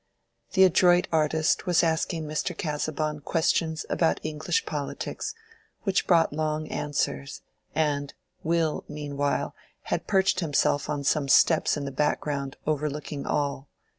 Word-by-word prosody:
The 190 - +6
adroit 180 -1 +5
artist 160 +1 +1
was 175 -2 +4
asking 165 0 0
Mr. 150 0 -3
Casaubon 150 -1 -2
questions 160 +1 0
about 165 - +1
English 155 - -1
polities, 430 - -4 0.5
which 195 -2 +1
brought 165 -4 +4
long 155 0 -1
answers, 75 - -2 0.3
and, 145 -2 0 0.3
Will 165 -1 0
meanwhile 145 -1 -2 0.4
had - - -2
perched 190 -1 +3
himself 145 -3 +1
on 145 -2 -2
some 140 0 +1
steps 155 +3 +4
in 145 - -4
the 140 - -4
background 140 -1 -1
overlooking 150 -1 -2
all. 140 -1 -1
155 Hz, 125 wpm, -26 LUFS, 145-165 Hz, 0.5 s, The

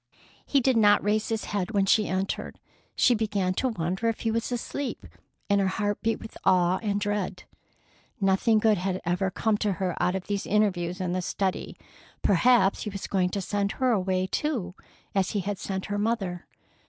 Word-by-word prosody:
He 280 - +3
did 255 -1 +2
not 205 -2 +5
raise 210 +1 +1
his 225 -1 -1
head 205 +1 -3
when 195 -1 +3
she 210 +2 +3
entered. 190 +1 -3 0.4
She 250 - +4
began 205 -4 0
to 260 +7 0
wonder 185 +1 -2
if 230 - -1
he 225 - 0
was 230 +2 -2
asleep, 250 +3 -4 0.4
and 200 -1 +3
her 195 - +2
heart 205 +2 -1
beat 225 0 0
with 220 - -10
awe 180 0 +3
and 205 -2 0
dread. 205 -2 -2 0.8
Nothing 195 +3 +3
good 215 -2 +3
had 185 0 -1
ever 180 +3 0
come 210 +3 0
to 210 -2 +1
her 180 0 -2
out 180 - +2
of 190 - -4
these 200 -1 -3
interviews 185 -4 +1
in 180 -1 -1
the 185 +1 -1
study. 190 +1 -2 0.5
Perhaps 200 +1 +4
he 210 - -3
was 200 -1 -6
going 185 -2 +1
to 200 +2 -3
send 200 +1 -1
her 260 -1 +1
away, 185 -3 +1
too, 240 -4 -2 0.4
as 195 -2 0
he - - +1
had 200 +1 -3
sent 190 -1 -4
her 205 -1 -2
mother. 200 -5 -2
200 Hz, 190 wpm, -27 LUFS, 185-220 Hz, 0.8 s, not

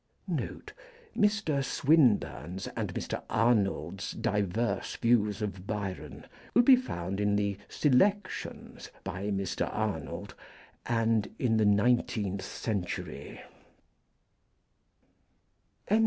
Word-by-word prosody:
Note - - -4 0.4
Mr. 205 -10 +2
Swlnburne's 105 - +2
and - - -2
Mr. - - -3
Arnold's 100 -5 +1
diverse 105 +3 -1
views 105 -3 +2
of 100 -2 -5
Byron 100 -3 -5 0.3
will 245 - +7
be 260 +1 +9
found 95 - -3
in 105 0 +2
the 100 -1 0
Selections 190 +9 0
by 95 +3 -4
Mr. 95 -3 -1
Arnold - - -3 0.5
and 115 -2 +1
in 115 -3 +2
the 110 - +3
Nineteenth 105 -2 +2
Century. 100 -2 -4
105 Hz, 90 wpm, -30 LUFS, 100-125 Hz, 0.5 s, be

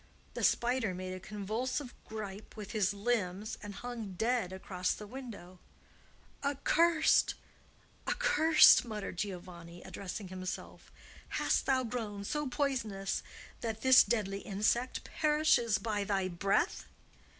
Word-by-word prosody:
The - - -4
spider 240 -5 +2
made 185 0 -5
a 185 - -6
convulsive 225 +7 -3
gripe 210 -2 -7
with 210 -2 -7
his 210 -4 +1
limbs 205 -2 -2
and 205 -1 -7
hung 230 -5 -6
dead 225 -1 0
across 185 -1 -2
the 210 - -8
window. 205 -7 -9 0.8
"Accursed! 315 +4 +3 0.7
accursed!" 315 0 +6
muttered 210 -6 -5
Giovanni, 175 -3 -6
addressing 195 0 -6
himself. 185 0 -7 0.5
"Hast - - +1
thou 260 -1 +3
grown 220 -4 -4
so 295 +7 -2
poisonous 225 -9 -1 0.4
that 220 -1 -4
this 260 -1 +8
deadly 200 -4 -1
insect 215 +6 0
perishes 300 -8 +2
by 210 -1 -2
thy 195 -2 0
breath?" 195 +3 0
210 Hz, 115 wpm, -32 LUFS, 195-245 Hz, 0.8 s, this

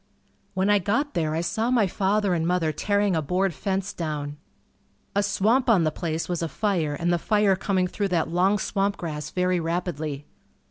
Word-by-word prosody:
When 190 +1 +1
I 205 0 +4
got 235 +10 0
there 155 -2 0
I 165 - 0
saw 220 +7 -1
my 240 -4 +3
father 195 +1 +1
and 165 -1 0
mother 175 -3 +1
tearing 205 +4 +1
a 160 - +1
board 180 +5 0
fence 190 +3 -2
down. 150 -3 -4 0.8
A 200 - +4
swamp 220 +6 +2
on 200 -7 +5
the 155 - +1
place 165 0 -3
was 175 -2 -2
afire 165 -3 -1
and 175 +1 +1
the 175 - +1
fire 205 0 +3
coming 190 -1 0
through 200 +2 -2
that 175 -4 0
long 180 +5 +2
swamp 200 0 -1
grass 150 -3 -5
very 180 0 +1
rapidly. 160 -4 -3
180 Hz, 185 wpm, -25 LUFS, 165-200 Hz, 0.8 s, on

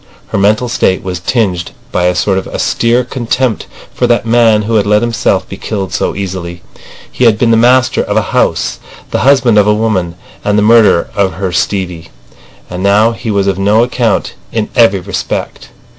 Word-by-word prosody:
Her - - -2
mental 105 +5 +2
state 95 -5 0
was 90 -2 -4
tinged 90 -3 -1 0.2
by 90 - 0
a 90 0 +1
sort 95 +1 +1
of - - -8
austere 120 +2 0
contempt 125 -1 -2 0.3
for - - 0
that 120 -1 +1
man 115 -2 +3
who 115 +2 -3
had 105 - +1
let 105 +2 +2
himself 115 -2 0
be - - -8
killed 95 -6 -4
so - - -1
easily. 90 -3 -6 0.5
He 125 - 0
had 110 -2 +4
been 115 0 +2
the - - +4
master 125 +2 +3
of - - -2
a - - +4
house, - - 0 0.3
the - - 0
husband 130 -5 +3
of 105 - +3
a 105 - +3
woman, 100 -6 -1 0.3
and 105 0 +1
the 105 - +2
murderer 110 -5 +4
of 100 -2 0
her 95 -1 -3
Stevie. 90 -2 -2 0.6
And 90 +1 -6
now 105 +3 +3
he 115 0 -6
was 100 -2 +1
of 95 -1 -1
no 105 +4 +3
account 120 -4 -1 0.2
in 110 -2 -2
every 100 -5 +3
respect. 95 0 -5
105 Hz, 190 wpm, -12 LUFS, 95-115 Hz, 0.6 s, had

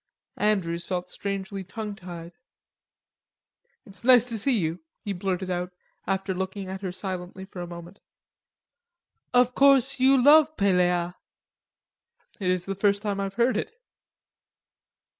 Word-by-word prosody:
Andrews 175 -5 0
felt 180 -1 -3
strangely 195 0 -4
tongue 210 +3 -6
tied. 175 -3 -9 1.5
"It's 200 -1 -12
nice 245 -1 +6
to 225 -2 -3
see 250 +3 +2
you," 165 -2 -2 0.3
he 200 - -2
blurted 185 0 -3
out, 180 0 -3 0.3
after 195 0 -1
looking 190 +1 -4
at 190 +1 -6
her 190 -2 -3
silently 185 0 -6
for 190 -2 -9
a 175 - -5
moment. 170 +2 -11 1.3
"Of 250 0 +4
course 275 -1 +5
you 265 +1 +5
love 305 +3 +6
Pelleas." 180 -3 +2 1.3
"It 185 -3 -1
is 180 -1 0
the 195 - -3
first 200 +1 +1
time 200 -2 -2
I've 195 0 -3
heard 240 +2 +2
it." 440 - -3
195 Hz, 135 wpm, -26 LUFS, 180-220 Hz, 1.5 s, nice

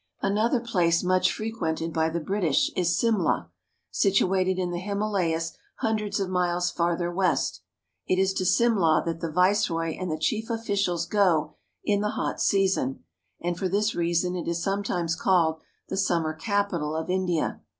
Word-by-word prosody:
Another 220 +5 +2
place 180 -8 +1
much 185 0 +3
frequented 165 -7 -3
by 160 -1 +1
the 170 +1 -2
British 170 -2 +1
is 175 -1 +1
Simla, 230 -2 +1 0.4
situated 190 -2 +2
in 180 -1 -1
the 175 - -3
Himalayas 185 -5 -1 0.2
hundreds 215 -2 -1
of 195 - -1
miles 180 -1 0
farther 175 0 0
west. 185 +1 0 0.5
It 185 - +2
is 190 0 +2
to 190 - -1
Simla 185 -4 +3
that 165 -1 -3
the 165 - -3
Viceroy 180 -2 +1
and 185 -1 -3
the 155 - -1
chief 220 +8 -1
officials 200 -7 -1
go 170 -7 +2 0.3
in 205 -1 +1
the 210 - 0
hot - - -2
season, 190 -9 +1 0.4
and 175 0 -2
for 190 - -1
this 210 +4 +1
reason 175 +1 0
it 175 - -4
is 170 0 -1
sometimes 195 -4 -1
called 165 -3 +2 0.3
the - - -3
summer 170 -5 +1
capital 175 -4 -1
of 160 0 -3
India. 180 -3 -1
180 Hz, 160 wpm, -26 LUFS, 165-200 Hz, 0.5 s, much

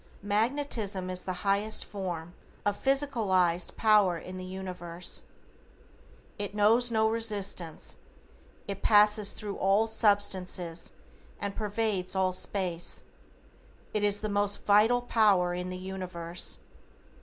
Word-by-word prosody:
Magnetism 210 -3 -1
is 180 0 -3
the 185 +1 -5
highest 200 +2 +2
form 175 -4 -5 0.3
of 205 - +1
physicalized 210 -11 +1
power 210 -5 +4
in 185 +2 -8
the 185 - -6
universe. 180 -2 -5 1.2
It 205 0 -4
knows 225 +4 +4
no 220 -1 +2
resistance, 205 -7 -2 0.7
it 200 -1 -5
passes 210 -1 +5
thru 205 -1 -6
all 195 +3 +3
substances 195 -6 0 0.5
and 200 -1 -3
pervades 210 -3 -1
all 190 -1 +1
space. 180 -2 -1 0.9
It 210 - 0
is 205 0 +3
the 215 - -2
most 205 0 0
vital 220 +4 +4
power 200 -7 +3
in 180 +1 -4
the 185 - -5
universe. 180 -2 -4
200 Hz, 115 wpm, -29 LUFS, 185-215 Hz, 1.2 s, passes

